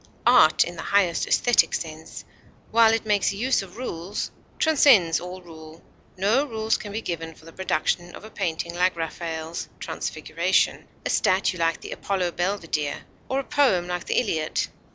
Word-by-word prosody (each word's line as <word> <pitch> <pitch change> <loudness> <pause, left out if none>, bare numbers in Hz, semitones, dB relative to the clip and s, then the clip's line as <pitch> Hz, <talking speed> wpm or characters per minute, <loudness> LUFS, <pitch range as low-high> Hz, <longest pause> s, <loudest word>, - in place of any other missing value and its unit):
Art 235 -11 +6
in 175 - -7
the - - -4
highest 185 -4 +1
esthetic 245 -1 +3
sense, 160 0 -7 0.5
while 225 -1 +6
it 225 0 0
makes 205 -2 +2
use 250 +5 +1
of 195 +1 -11
rules, 195 -6 -4 0.3
transcends 255 - +5
all 180 +1 -8
rule; 160 -1 -13 0.3
no 210 +9 +3
rules 220 -5 -1
can 205 - -6
be 220 +2 -4
given 165 -2 -5
for 160 - -19
the 165 - -13
production 175 -1 -1
of - - -12
a 215 - -11
painting 170 -1 -3
like 180 +1 +1
Raffael's 165 0 -5
"Transfiguration," - - -1 0.2
a - - -1
statue 185 -1 +1
like 165 0 0
the - - -8
Apollo 185 -3 -1
Belvedere, 170 -5 -2 0.3
or 265 - 0
a - - -3
poem 255 -12 +2
like 180 -1 -4
the - - -1
Iliad. 160 -10 -1
180 Hz, 165 wpm, -24 LUFS, 165-220 Hz, 0.5 s, Art